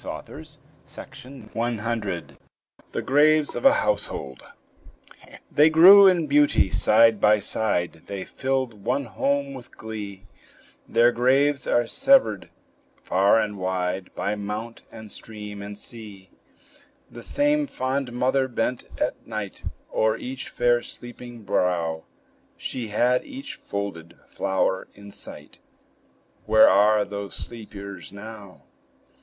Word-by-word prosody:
WILLIAM 120 Hz, -2 st, -8 dB
HOWITT 105 Hz, -5 st, -3 dB, 0.6 s
THE -, -, -3 dB
GRAVES 150 Hz, +2 st, +3 dB
OF -, -, -4 dB
A 275 Hz, -, +8 dB
HOUSEHOLD -, -, -3 dB, 1.1 s
They 150 Hz, +2 st, +5 dB
grew 190 Hz, +5 st, +9 dB
in 175 Hz, -4 st, +3 dB
beauty, 145 Hz, -9 st, +3 dB
side 110 Hz, -1 st, +4 dB
by 105 Hz, 0 st, +5 dB
side, 90 Hz, -6 st, -2 dB
They 100 Hz, -2 st, -5 dB
filled 130 Hz, -6 st, -3 dB
one 135 Hz, +5 st, 0 dB
home 140 Hz, +6 st, -1 dB
with 125 Hz, -2 st, -12 dB
glee; 105 Hz, -3 st, -7 dB, 0.6 s
Their 120 Hz, +1 st, +4 dB
graves 135 Hz, +4 st, +2 dB
are 120 Hz, -, +2 dB
severed 260 Hz, -, +3 dB, 0.5 s
far 100 Hz, +4 st, +3 dB
and 105 Hz, -2 st, -3 dB
wide, 90 Hz, 0 st, -2 dB
By 100 Hz, -, -1 dB
mount, 105 Hz, +3 st, -5 dB
and 110 Hz, -2 st, -10 dB
stream, 105 Hz, -2 st, -8 dB
and 100 Hz, 0 st, -8 dB
sea. 105 Hz, -5 st, -10 dB, 0.8 s
The 120 Hz, -, -10 dB
same 290 Hz, -, +1 dB
fond 130 Hz, -, -2 dB
mother 130 Hz, +2 st, +1 dB
bent 125 Hz, 0 st, -2 dB
at -, -, -2 dB
night 110 Hz, -3 st, -6 dB, 0.3 s
O'er 110 Hz, 0 st, +2 dB
each 130 Hz, +1 st, -6 dB
fair, 120 Hz, 0 st, +2 dB
sleeping 120 Hz, -1 st, -10 dB
brow; 85 Hz, -4 st, -1 dB, 0.5 s
She 120 Hz, -3 st, -4 dB
had 125 Hz, +4 st, +1 dB
each 275 Hz, 0 st, -8 dB
folded 90 Hz, -5 st, -6 dB
flower 95 Hz, 0 st, -1 dB
in 100 Hz, 0 st, -12 dB
sight: -, -, -9 dB, 0.9 s
Where 110 Hz, -, +7 dB
are 105 Hz, +2 st, +4 dB
those 100 Hz, -1 st, -6 dB
sleepers 100 Hz, -7 st, -8 dB
now? 100 Hz, -1 st, -11 dB
110 Hz, 115 wpm, -24 LUFS, 100-130 Hz, 1.1 s, grew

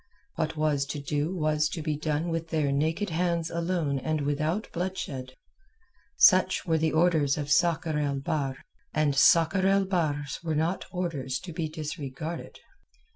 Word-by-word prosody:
What 155 Hz, 0 st, -2 dB
was 150 Hz, -3 st, +1 dB
to 150 Hz, 0 st, -4 dB
do 145 Hz, +3 st, -1 dB
was 155 Hz, -2 st, +1 dB
to 160 Hz, -, -5 dB
be 155 Hz, -1 st, -1 dB
done 155 Hz, +2 st, -1 dB
with 165 Hz, 0 st, -3 dB
their 155 Hz, -4 st, +1 dB
naked 160 Hz, +7 st, 0 dB
hands 170 Hz, 0 st, 0 dB
alone 170 Hz, -5 st, -1 dB
and 155 Hz, +2 st, -1 dB
without 155 Hz, +8 st, -1 dB
bloodshed. 155 Hz, -8 st, -4 dB, 0.8 s
Such -, -, +5 dB
were 160 Hz, -2 st, +2 dB
the 160 Hz, 0 st, +1 dB
orders 155 Hz, -4 st, +3 dB
of 145 Hz, -1 st, -3 dB
Sakr 165 Hz, -1 st, +2 dB
el 145 Hz, -1 st, 0 dB
Bahr, 135 Hz, -1 st, -2 dB, 0.4 s
and 150 Hz, -2 st, +2 dB
Sakr 170 Hz, +7 st, +5 dB
el 195 Hz, 0 st, +3 dB
Bahr's 150 Hz, -7 st, -1 dB
were 160 Hz, -2 st, -1 dB
not 165 Hz, +5 st, 0 dB
orders 160 Hz, -8 st, -2 dB
to 175 Hz, -2 st, -8 dB
be 160 Hz, -1 st, -2 dB
disregarded. 155 Hz, +1 st, -6 dB
155 Hz, 155 wpm, -28 LUFS, 145-170 Hz, 0.8 s, Such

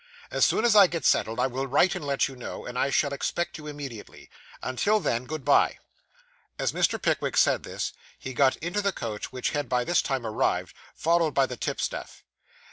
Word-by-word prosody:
As -, -, +1 dB
soon -, -, +2 dB
as 230 Hz, -3 st, +4 dB
I 200 Hz, -2 st, +9 dB
get 165 Hz, -5 st, -4 dB
settled, 110 Hz, -, +2 dB
I -, -, +3 dB
will 130 Hz, +1 st, -2 dB
write 145 Hz, +7 st, +3 dB
and -, -, -5 dB
let 140 Hz, -1 st, +1 dB
you 135 Hz, -, -10 dB
know, 125 Hz, -, -7 dB
and 125 Hz, -, -7 dB
I 135 Hz, -, +1 dB
shall 140 Hz, +1 st, +1 dB
expect 170 Hz, +4 st, -2 dB
you 150 Hz, -, -9 dB
immediately. 140 Hz, -7 st, -9 dB, 0.3 s
Until 205 Hz, -, +1 dB
then, 125 Hz, -, -1 dB
good 155 Hz, 0 st, -6 dB
bye.' 145 Hz, -, +4 dB, 0.8 s
As -, -, 0 dB
Mr. -, -, +1 dB
Pickwick -, -, 0 dB
said -, -, +4 dB
this, -, -, -4 dB, 0.2 s
he 130 Hz, -, -7 dB
got 130 Hz, +1 st, +3 dB
into 175 Hz, +6 st, -2 dB
the 200 Hz, -1 st, +1 dB
coach 110 Hz, -3 st, -5 dB
which 130 Hz, -1 st, -2 dB
had 145 Hz, -4 st, -2 dB
by 125 Hz, -1 st, +1 dB
this 175 Hz, +6 st, +2 dB
time 135 Hz, -4 st, -2 dB
arrived, 110 Hz, -, -1 dB, 0.2 s
followed 165 Hz, -1 st, +1 dB
by 135 Hz, -, +4 dB
the 125 Hz, -, -6 dB
tipstaff. -, -, -4 dB
140 Hz, 205 wpm, -27 LUFS, 125-165 Hz, 0.8 s, I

